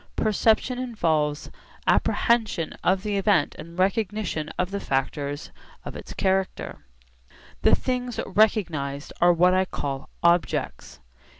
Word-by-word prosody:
Perception 220 +4 +2
involves 160 -12 -1 0.3
apprehension 220 -8 +1
of 185 +1 +2
the 205 -2 -1
event 195 -6 +2
and 170 +2 -10
recognition 195 -4 -1
of 180 +1 -1
the 200 - -2
factors 140 0 -2 0.3
of - - -7
its - - -9
character. 190 - -1 0.8
The - - +5
things 250 -2 -3
recognised 170 -9 0
are 175 0 +7
what 180 +2 +4
I 185 0 +3
call 140 -6 -5
'objects.' 170 0 0
185 Hz, 115 wpm, -25 LUFS, 155-215 Hz, 0.8 s, are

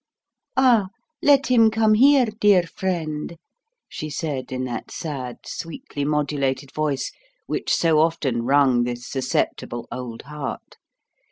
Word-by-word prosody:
"Ah, 245 -7 +5 0.3
let 280 -1 +5
him 230 -3 +6
come 220 0 +3
here, 270 +3 +6
dear 210 -4 +3
friend," 165 -3 -3 0.5
she 155 - -6
said 145 -4 -4
in 130 0 -2
that 125 -2 -5
sad, 130 -6 -5
sweetly 165 - -6
modulated 140 -2 -1
voice 150 -3 -1 0.3
which - - -2
so 160 -2 +3
often 150 -7 +1
wrung 130 -1 +3
this 120 0 -4
susceptible 125 -2 -2
old 120 -3 -6
heart. 150 0 -7
150 Hz, 120 wpm, -23 LUFS, 130-200 Hz, 0.5 s, him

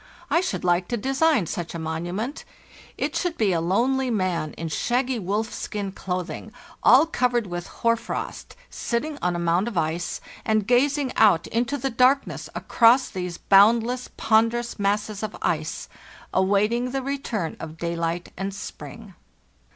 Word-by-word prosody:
I 335 - +4
should 190 - -3
like 175 0 +2
to 240 - -1
design 270 - +2
such 170 +1 -5
a - - -2
monument. 175 - -4 0.5
It - - -2
should 355 -2 -1
be 205 -4 +2
a 165 - +1
lonely 250 +9 +1
man 185 -8 -1
in 165 - -5
shaggy 245 +9 0
wolfskin 205 0 -3
clothing, 185 +3 -4 0.3
all 260 +7 +7
covered 245 -7 +1
with 175 -2 -5
hoar 230 0 +1
frost, 230 - -6 0.2
sitting 285 +5 -3
on 180 0 0
a - - -1
mound 170 +4 +1
of 225 -6 -4
ice, 165 +2 -1 0.2
and 215 -2 +1
gazing 270 +3 +2
out 195 -7 +5
into 245 +5 -1
the 270 +1 -2
darkness 255 +4 +2
across 240 +2 +4
these 180 -2 -4
boundless, 230 +5 +4
ponderous 230 +1 +2
masses 205 +1 0
of 215 -1 -4
ice, - - -2 0.5
awaiting 210 +6 +2
the 270 +1 -3
return 245 - -3
of 160 0 -8
daylight 170 +1 -2
and 195 +1 -4
spring. 205 0 -9
215 Hz, 150 wpm, -24 LUFS, 180-250 Hz, 0.5 s, all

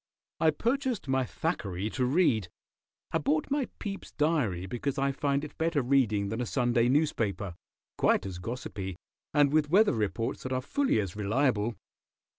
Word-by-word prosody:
I 160 - +5
purchased 240 - -1
my 130 -1 +1
Thackeray 105 - -2
to 130 - 0
read. 125 - +3 0.6
I 165 - +1
bought 150 - 0
my 280 -2 +1
Pepys 195 -2 -6
Diary 145 - +1
because 130 +8 -3
I 140 0 +2
find 140 0 0
it 150 - -7
better 160 -4 +1
reading 115 -6 +2
than 110 +3 -2
a - - -1
Sunday 120 -1 +2
newspaper, 115 - 0 0.5
quite - - +3
as 95 -2 -5
gossipy, 100 -4 -5 0.4
and 145 -1 +4
with 155 -1 +3
weather 205 +6 +5
reports 110 +1 -1
that 130 - -3
are 130 - 0
fully 275 - +1
as 100 -3 -3
reliable. 110 +1 +1
130 Hz, 160 wpm, -29 LUFS, 110-155 Hz, 0.6 s, I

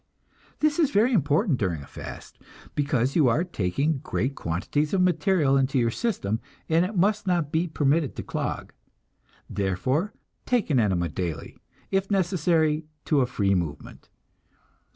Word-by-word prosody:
This 305 +1 +2
is 310 -5 +4
very 240 0 +3
important 155 - +2
during 85 -9 -1
a - - -11
fast, - - -10 0.3
because 140 -3 0
you 155 -6 +5
are 135 +8 +2
taking 140 - -1
great 135 -1 -2
quantities 140 - -1
of 185 - +2
material 175 -5 +2
into 135 0 +2
your 115 -2 +2
system 115 - -1 0.3
and 165 +2 +3
it 190 +2 -3
must 205 +2 +2
not 170 -5 +1
be 165 +3 +1
permitted 150 -1 +1
to - - -5
clog. - - -4 0.7
Therefore 130 - -1 0.4
take 240 -9 +1
an 130 - +4
enema 95 -6 +1
daily, 85 -2 -4 0.4
if 195 0 0
necessary 165 -5 +1 0.2
to 150 -3 +3
a 125 - +2
free 100 -5 +1
movement. 85 -6 -4
150 Hz, 150 wpm, -26 LUFS, 115-185 Hz, 0.7 s, you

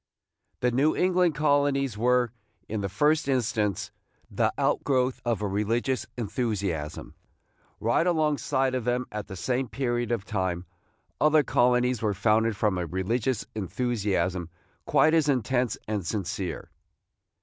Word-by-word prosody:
The 125 - +2
New 140 +6 +2
England 180 -3 +2
colonies 145 -4 +2
were, 125 +1 +2 0.4
in 105 -1 -3
the 100 - -2
first 150 +9 +2
instance, 110 -7 0 0.4
the - - +1
out - - +1
growth 130 -2 +1
of 115 -3 -1
a - - +1
religious 115 +6 -1
enthusiasm. 100 - -3 0.7
Right 120 +10 +2
alongside 150 -5 +1
of 130 -2 -1
them, 125 +2 0
at 105 -1 -5
the 95 - -7
same 125 +7 -1
period 120 -2 -2
of 110 -4 -1
time, 95 -5 -2 0.5
other 155 0 +5
colonies 125 -1 +2
were 105 -3 0
founded 110 +2 +2
from 105 -4 +1
a 85 - -2
religious 110 - -1
enthusiasm 95 -5 -1 0.4
quite 155 - +4
as 160 -3 +3
intense 125 -1 +1
and 105 -2 -2
sincere. 95 0 -4
120 Hz, 135 wpm, -27 LUFS, 105-130 Hz, 0.7 s, other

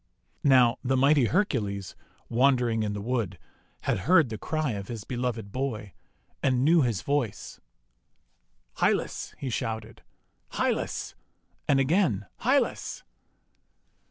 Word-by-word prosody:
Now, 125 -4 +5
the 130 0 +1
mighty 140 0 +4
Hercules, 110 - -1 0.3
wandering 120 -2 +2
in 105 -1 -1
the 100 -1 -5
wood, 115 -6 -2 0.4
had - - 0
heard 160 - +4
the 110 - -4
cry 155 -4 -1
of 100 -2 -5
his 115 -4 -6
beloved 120 -3 -3
boy, 110 -6 -3 0.5
and 130 -1 +2
knew 165 +1 +5
his 115 -9 0
voice. 140 -8 -2 1.2
'Hylas!' - - 0
he 135 -3 -4
shouted, 110 -2 -4 0.5
!£ - - -8
Hylas!" - - -1 0.5
and 135 - +4
again, 135 - +2
"Hylas!" - - 0
125 Hz, 120 wpm, -27 LUFS, 110-140 Hz, 1.2 s, Now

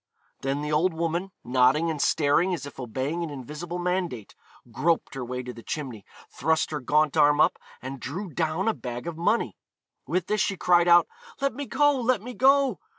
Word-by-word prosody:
Then 135 +2 -2
the 150 - -3
old 160 +3 +2
woman, 170 +3 -2
nodding 130 +7 +3
and 150 -3 -3
staring 165 +5 +2
as 155 - -7
if 145 - -10
obeying 135 +7 -3
an 165 - -4
invisible 150 +6 -6
mandate, 175 - -2 0.4
groped 165 +7 0
her 135 -2 -4
way 125 +1 -4
to 125 0 -7
the 115 - -11
chimney, 125 -7 -6 0.2
thrust 160 +3 0
her 150 - -2
gaunt 150 +3 +2
arm 145 -1 +4
up, - - +3 0.2
and 135 +1 -6
drew 170 +10 -5
down 165 +5 -1
a 225 - +3
bag 120 - -6
of 170 -1 -4
money. 175 +8 0 0.5
With 180 -1 0
this 210 0 0
she 195 - 0
cried 175 -1 +4
out, 175 0 +6 0.3
'Let 275 0 0
me 280 +2 -6
go! 290 +5 +3
let 245 -1 +2
me 250 +1 -7
go!' 270 +1 +3
160 Hz, 195 wpm, -26 LUFS, 135-180 Hz, 0.5 s, out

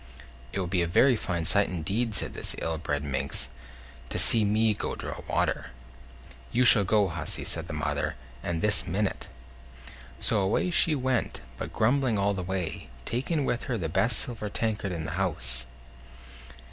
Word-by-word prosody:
"It - - -3
would 90 -2 -3
be 90 -2 +2
a 85 - +1
very 125 +9 +4
fine 85 -6 -2
sight 100 +3 +3
indeed," 100 +6 -2
said - - -1
this - - -3
ill 80 -1 -2
bred 75 -3 -2
minx, 70 -2 -2 0.6
"to - - -2
see 115 -2 +5
me 110 +2 +3
go 100 - -4
draw - - -6
water." - - 0 0.8
"You 125 +1 +3
shall 105 -4 +9
go, 105 0 +3
hussy!" 85 0 -3
said - - -2
the - - -6
mother; - - -2 0.3
"and 85 -2 -3
this 105 -2 +4
minute." 95 +3 -2 0.9
So - - +1
away 100 - +1
she 160 -2 +3
went, 130 -3 -1 0.2
but - - -5
grumbling 125 0 +2
all 100 +1 +2
the 95 - -3
way, 90 -6 -4 0.2
taking 135 +5 -1
with 120 - -1
her 125 -4 -1
the 85 -6 -3
best 115 +7 +3
silver 110 -4 -2
tankard 105 -2 -2
in 80 -3 -4
the - - -4
house. 65 -9 0
100 Hz, 170 wpm, -28 LUFS, 85-115 Hz, 0.9 s, shall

